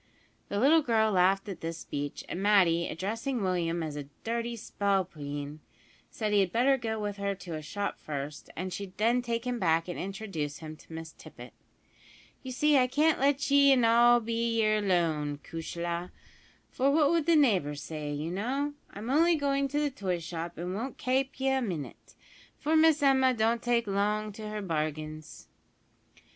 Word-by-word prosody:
The 200 - -1
little 305 +7 +5
girl 220 -5 +2
laughed 195 +1 +3
at 195 - -6
this 165 0 -4
speech, 145 -2 -5
and 180 - -4
Matty, 185 -5 +4
addressing 225 - -3
Willie 180 -3 0
as 165 -3 -3
a 145 -1 -5 0.2
"dirty 235 +1 -2
spalpeen," 155 -9 -2 0.5
said 215 -2 -2
he 205 - +5
had 190 -3 +2
better 255 +5 +3
go 225 -4 -3
with 205 -1 -3
her 200 0 -2
to 180 -3 -8
a 155 - -4
shop 200 +6 -4
first, 145 0 -6
and 185 +2 -4
she'd 195 -2 -7
then 235 +3 +2
take 235 0 -3
him 245 -1 -2
back 165 -2 +2
and 175 - -5
introduce 190 -7 -4
him 155 0 -8
to - - -18
Miss 160 0 -7
Tippet. - - -13 0.9
"You 260 - -7
see 290 +2 +3
I 250 - +3
can't 300 +5 +2
let 280 +1 +1
ye 280 0 +6
in 250 -3 +4
all 240 +1 +6
be 230 0 -1
yer 215 0 +2
lone, 160 -7 0
cushla; 170 +1 -4 0.6
for 270 +2 +1
what 295 0 +4
would 335 -2 +1
the 335 - +5
neighbours 180 - +2
say, 150 -2 -5
you 150 +3 -3
know! 265 +10 -2 0.2
I'm 220 +5 -5
only 330 +4 +4
goin' 275 -2 0
to 290 +2 -1
the 295 -1 0
toy 190 -7 -2
shop, 170 0 -6
an' 175 +2 -4
won't 235 +7 -4
kape 265 +1 -1
ye 270 0 +1
a 265 0 +1
minit, 175 - -6 0.4
for 310 +2 0
Miss 315 -2 +5
Emma 265 -2 +4
don't 230 +1 +1
take 240 -1 +1
long 210 +1 0
to 215 +1 -7
her 210 -1 -4
bargains." 155 -2 -4
210 Hz, 180 wpm, -29 LUFS, 170-255 Hz, 0.9 s, ye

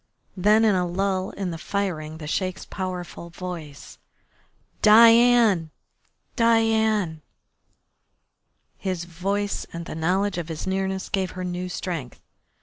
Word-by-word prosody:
Then 210 +4 +4
in 215 - +4
a 180 -1 +1
lull 190 +1 -1
in 190 -3 -4
the 165 - -6
firing 160 -6 -3
the 155 - -8
Sheik's 185 +4 -2
powerful 180 -2 -6
voice: 170 -5 -8 0.8
"Diane! 230 -5 +6 0.7
Diane!" 220 -7 +2 1.6
His 185 -3 -3
voice 195 +4 -2
and 170 0 -6
the - - -7
knowledge 180 +4 0
of 170 -1 -6
his 160 -1 -5
nearness 190 0 -2
gave 190 -2 -1
her 185 - -3
new 180 0 -4
strength. 165 -9 -5
185 Hz, 120 wpm, -24 LUFS, 170-205 Hz, 1.6 s, Diane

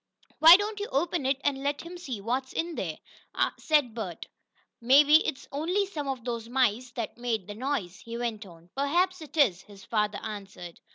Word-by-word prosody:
"Why 330 +3 +10
don't 415 +1 -3
you 410 - -3
open 300 0 0
it, 270 0 +2
and 275 -2 0
let 285 +1 -1
him 340 +2 -9
see 265 - -6
what's 255 +5 -2
in 335 +1 -2
there," 165 - -4 0.6
said 295 -7 +2
Bert. 200 -7 -6 0.6
"Maybe 290 +6 +6
it's 260 - -4
only 350 +8 0
some 305 -7 -5
of 260 -3 -4
those 235 -2 -4
mice 250 -1 +1
that 235 0 -5
made 230 -5 -2
the 205 - -7
noise," 215 -6 -3
he 230 0 -7
went 230 -3 -3
on. 170 0 -17
"Perhaps 350 +6 +1
it 310 +1 -11
is," 195 - +4
his 200 -2 -15
father 210 -2 0
answered. 195 -5 -8
255 Hz, 185 wpm, -28 LUFS, 215-300 Hz, 0.6 s, Why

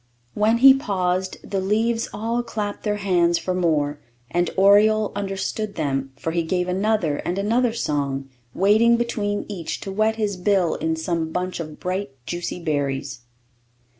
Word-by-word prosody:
When 215 +2 +2
he 265 +2 +9
paused, 185 -7 -1
the 195 - -1
leaves 225 +4 0
all 230 +3 -1
clapped 210 -3 -4
their 210 -1 -1
hands 175 -4 +2
for 185 - -2
more; 155 -5 0 0.3
and 175 0 +1
oriole 210 +2 +5
understood 200 +1 -3
them, 135 -3 -2
for 160 +4 -4
he 170 +1 0
gave 180 +2 -1
another 185 -5 +1
and 180 - -3
another 230 +4 +1
song, 140 -8 -2 0.3
waiting 220 +5 +4
between 210 -4 -2
each 185 -6 -5
to 195 - -5
wet 215 +3 +1
his 210 -3 -2
bill 185 -2 +2
in 160 +1 -1
some 160 0 -2
bunch 180 +1 -3
of 155 -2 -7
bright, 185 0 -2 0.2
juicy 175 +5 -4
berries. 140 -5 -2
190 Hz, 155 wpm, -23 LUFS, 165-215 Hz, 0.3 s, he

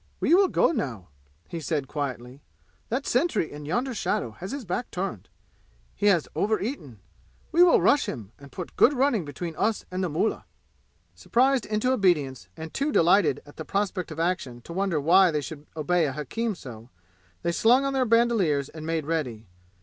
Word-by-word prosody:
"We - - +2
will 385 +2 +6
go - - +2
now," 125 - -4 0.4
he 170 - -5
said 150 -3 -2
quietly. 130 -2 -5 0.5
"That 260 +4 -2
sentry 245 - +1
in 145 0 -8
yonder 245 - -1
shadow 120 - -1
has 180 - -8
his 275 -3 -5
back 180 +7 -3
turned. 190 +2 -5 0.6
He 205 - 0
has 180 -6 +3
over 215 +1 +1
eaten. 150 - -6 0.5
We 340 - +4
will 355 -1 +7
rush 290 - +4
him 105 -4 -6
and 140 -1 -14
put 180 +3 -7
good 275 - +5
running 255 - +1
between 160 +3 -6
us 220 +1 0
and 185 +1 -2
the 180 - -1
mullah." 165 +8 -1 0.7
Surprised 260 0 +1
into 215 +4 0
obedience, 145 - +1
and 160 0 -8
too 285 +2 0
delighted 180 - +3
at 145 - -16
the 160 - -5
prospect 195 0 -2
of 160 0 -7
action 165 -9 -2
to 170 - -9
wonder 190 -3 0
why 180 +5 +5
they 150 -2 -1
should 150 0 -9
obey 170 +1 +2
a 135 - -3
hakim 210 - -3
so, 120 -6 -11 0.5
they 170 - +1
slung 245 +9 +4
on 275 - -1
their 265 -1 +2
bandoliers 220 - +2
and 155 0 -8
made 165 -2 -1
ready. 135 -9 -3
175 Hz, 185 wpm, -26 LUFS, 145-230 Hz, 0.7 s, will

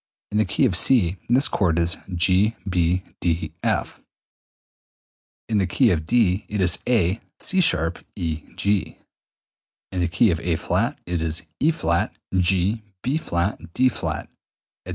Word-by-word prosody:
In 105 - +1
the 110 - +3
key 130 - +1
of 100 -8 +1
C 95 -3 +2
this 130 +4 +5
chord 85 -5 +1
is 85 +1 +1 0.2
G 95 +6 +3
B 90 0 +1 0.2
D 85 -1 -1
F; - - -1 1.5
in 110 -2 +1
the 95 - +1
key 120 +6 +3
of 80 -3 -1
D 110 -5 +2
it 105 - -2
is 90 -2 +2
A 105 -5 +2 0.2
C[sharp] 90 - +1
E 80 -5 -3
G; 100 -1 0 0.9
in 95 - -3
the 85 - +2
key 95 +5 +3
of 80 - -1
A[flat] 85 -2 0
it 90 -2 -2
is 80 +1 -1 0.2
E[flat] 150 - +1 0.2
G 95 +4 +2 0.2
B[flat] 85 - -2
D[flat], 130 -2 0
etc. - - -23
90 Hz, 140 wpm, -23 LUFS, 85-110 Hz, 1.5 s, this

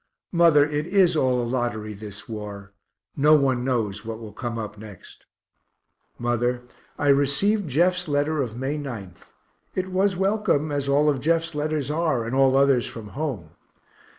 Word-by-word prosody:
Mother, 165 -4 +5
it 150 +1 -2
is 180 -2 +3
all 130 -4 +2
a - - -2
lottery, 115 -3 -2
this 105 0 -9
war; 105 -2 -8 0.4
no 150 +2 +5
one 135 -4 +2
knows 110 -6 -1
what 115 -1 -5
will 110 -3 -10
come 120 0 -4
up 110 -1 -5
next. 105 -3 -13 0.9
Mother, 120 +1 -1 0.3
I 145 - +1
received 145 +8 +2
Jeff's 180 +5 +2
letter 145 +1 0
of 120 -3 -4
May 135 +4 -2
9th 110 -11 -8 0.5
it 185 0 -2
was 190 +1 +2
welcome, 195 -6 +1
as 140 -1 -2
all 145 +2 +3
Jeff's 165 +4 0
letters 150 -1 -2
are, 155 -7 0
and 115 - -4
all 135 0 +4
others 135 -3 +3
from 110 -3 -9
home. 125 - -4
135 Hz, 155 wpm, -24 LUFS, 115-155 Hz, 0.9 s, Mother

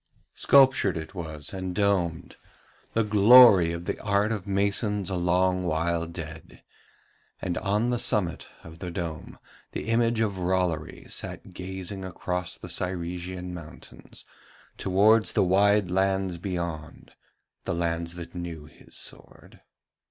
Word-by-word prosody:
Sculptured 130 -9 +4
it 80 +2 -7
was 80 -4 -6
and 95 -1 -4
domed, 95 -5 0 0.6
the 115 - +2
glory 105 -3 +7
of 85 +1 -5
the - - -3
art 100 0 +1
of 105 -3 -4
masons 100 0 0
a - - -1
long 90 +1 +1
while 85 0 0
dead, 80 -1 -9 0.8
and 90 - -3
on 105 +4 0
the 120 - 0
summit 90 -7 -1 0.2
of 80 0 -12
the 90 - -5
dome 85 -2 -6 0.4
the - - -4
image 115 0 +2
of 100 -4 -1
Rollory 90 -3 -1
sat 95 - -7
gazing 95 +1 -6
across 90 -1 -4
the - - -10
Cyresian 90 0 -4
mountains 85 -3 -12 0.5
towards 105 +4 +3
the - - +3
wide 100 +1 +3
lands 95 -1 0
beyond, 85 -4 -5 0.5
the - - -1
lands 85 0 -2
that 85 -1 -8
knew 85 -4 -6
his 75 - -16
sword. - - -9
90 Hz, 130 wpm, -26 LUFS, 85-100 Hz, 0.8 s, glory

